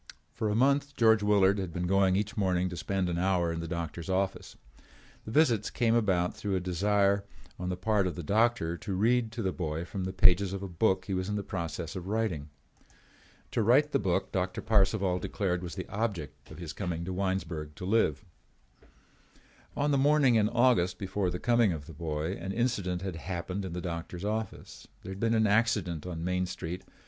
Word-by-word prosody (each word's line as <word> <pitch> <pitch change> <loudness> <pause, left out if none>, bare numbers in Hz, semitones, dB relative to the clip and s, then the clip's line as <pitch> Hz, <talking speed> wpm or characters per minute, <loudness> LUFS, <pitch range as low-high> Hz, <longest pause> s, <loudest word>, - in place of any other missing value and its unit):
For 110 -2 -1
a 105 - 0
month 140 +3 +2
George 110 -2 +5
Willard 100 -1 +4
had 95 -3 -3
been 90 +2 -3
going 95 0 +3
each 105 +4 -1
morning 90 -3 +1
to 90 - -6
spend 90 +4 -1
an 85 -1 -1
hour 90 -2 +1
in 85 - -4
the 85 - -4
doctor's 85 0 -5
office. 95 +1 -2 0.7
The 110 - -6
visits 120 -7 +3
came 115 -3 +1
about 95 -6 +1
through 100 -2 -2
a - - +1
desire 100 +2 +2 0.4
on 90 0 -3
the 90 - -2
part 100 0 +1
of 90 - -4
the 85 - -6
doctor 105 -3 +1
to 95 +2 -4
read 115 +3 +2
to 115 -1 -3
the 95 - 0
boy 80 -2 -3
from 95 0 -4
the 95 - -2
pages 95 0 +4
of 100 0 -4
a - - -3
book 95 +1 +1
he 95 - -3
was 95 +1 -2
in 105 - -1
the 100 - -2
process 85 -1 -4
of 90 -1 -6
writing. 100 -9 -1 1.0
To - - +1
write 135 +7 +4
the - - +2
book 95 -4 0
Doctor 95 -1 -1
Parcival 100 -3 +2
declared 90 -2 -2
was 90 -2 -6
the 95 - -5
object 85 - -4
of - - -11
his 85 -4 -6
coming 85 -3 -3
to 95 - -4
Winesburg 90 -5 -2
to 90 - -7
live. 110 +1 +1 1.5
On 145 +1 +1
the 140 - +3
morning 145 -2 +4
in 110 -2 +3
August 120 -7 +3
before 95 -1 -1
the 90 - -3
coming 120 -2 +3
of 75 -3 -6
the 80 - -11
boy, 75 +1 -3
an 95 +3 -4
incident 100 -7 -1
had 95 -4 -4
happened 90 +3 -4
in 95 -3 -5
the 90 - -4
doctor's 85 +1 -5
office. 110 +1 -4 0.2
There 95 - -7
had 95 - -7
been 115 +1 +2
an 110 0 +3
accident 100 -6 +1
on 85 -2 -5
Main 90 +1 0
Street. 90 0 -5
95 Hz, 205 wpm, -30 LUFS, 90-110 Hz, 1.5 s, George